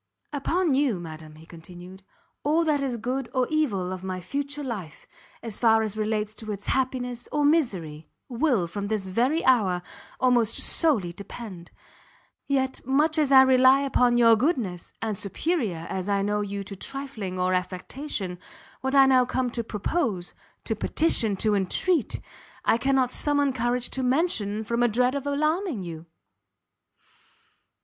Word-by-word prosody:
"Upon 325 +3 0
you, 260 -8 +1
madam," 155 -2 -9
he 160 +1 -15
continued, 175 +3 -12 0.4
"all 310 +3 +2
that 300 -3 +1
is 260 -3 -2
good 250 +3 -3
or 255 -1 +3
evil 205 -13 0
of 185 0 -8
my 185 -1 -4
future 285 +8 -4
life, 205 - -6 0.4
as 225 -3 -5
far 225 -2 +4
as 215 -1 -3
relates 215 0 -2
to 220 0 -7
its 200 -1 -6
happiness 250 -2 -2
or 295 -1 +1
misery, 185 - 0 0.2
will, 245 - +1
from 200 +4 -5
this 210 -2 -2
very 245 - 0
hour, 195 -9 +3 0.4
almost 245 -4 +3
solely 225 - +3
depend; 195 -2 -9 0.8
yet 265 -1 -1
much 300 +5 +2
as 290 -3 +1
I 265 -1 +9
rely 260 +1 +5
upon 250 -3 +2
your 230 -1 +6
goodness, 225 - -1
and 220 -2 -1
superior 200 - -2
as 190 0 -4
I 200 -1 +1
know 210 +1 0
you 200 -1 -4
to 195 +1 -8
trifling 230 -6 -6
or 185 0 +1
affectation, 185 +2 -4 0.4
what 265 +2 -2
I 270 -1 +8
now 260 -1 +5
come 250 0 -1
to 235 -1 -3
propose 210 - -1 0.3
to 220 - -2
petition 225 -5 +3
to 210 +2 +1
entreat 230 - 0 0.5
I 230 - +3
cannot 265 -1 +2
summon 285 -1 +2
courage 245 0 -1
to 265 - -3
mention, 250 - +1
from 235 +2 -1
a 240 - +5
dread 250 +3 +1
of 280 0 -4
alarming 305 - -1
you!" 165 -1 -8
235 Hz, 155 wpm, -25 LUFS, 195-275 Hz, 0.8 s, I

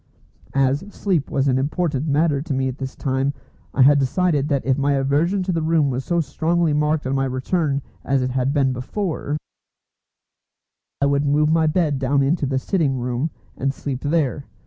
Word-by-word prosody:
As 135 0 +3
sleep 185 -8 -1
was 135 0 0
an 130 -1 +2
important 150 0 -1
matter 145 -1 +2
to 150 -2 -3
me 130 0 0
at 130 +1 -5
this 130 -1 -5
time, 135 +1 -1 0.4
I 135 - +4
had 145 +2 +6
decided 150 +1 +1
that 140 -3 0
if 130 0 +3
my 140 +1 +1
aversion 145 +8 +1
to 185 - -1
the 165 -2 0
room 155 -3 +2
was 130 +1 -2
so 170 +4 0
strongly 165 +2 0
marked 150 0 +1
on 130 - -1
my 135 0 +1
return 140 +2 -1 0.2
as 135 -1 +1
it 130 - -1
had 130 +1 0
been 135 -3 +2
before, 150 - -3 1.6
I - - +4
would 140 0 +2
move 150 +2 +3
my 160 -1 +3
bed 155 -3 +1
down 140 +1 +2
into 145 +1 +1
the 135 0 0
sitting 140 -2 0
room, 125 +5 -2 0.3
and 135 +1 -1
sleep 135 -1 -5
there. 145 -2 0
140 Hz, 190 wpm, -22 LUFS, 135-160 Hz, 1.6 s, had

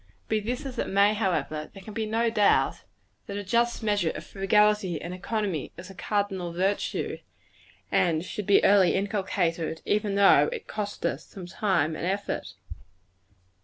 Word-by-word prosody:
Be 220 - +1
this 245 +7 -4
as 260 -3 -6
it - - -1
may, 200 +2 +4
however, 175 -7 -1
there 195 - -12
can 215 - -9
be 220 0 -2
no 225 +1 +1
doubt 205 - +2 0.4
that 200 - -5
a 205 - -4
just 235 +4 +1
measure 205 -6 +1
of - - -6
frugality 205 -3 +2
and 175 - -6
economy 195 -4 -3
is 180 +2 -9
a - - -11
cardinal 195 -3 -2
virtue, 190 +4 -1 0.7
and 175 -4 +2
should 205 +1 -5
be 200 - +5
early 195 -3 +5
inculcated, 185 -5 -1
even 205 -1 0
though 200 - +6
it 470 -3 -6
cost 205 -1 -5
us - - -1
some 190 -3 -9
time 175 -4 0
and 170 - -3
effort. 200 +2 -3
200 Hz, 165 wpm, -27 LUFS, 180-210 Hz, 0.7 s, though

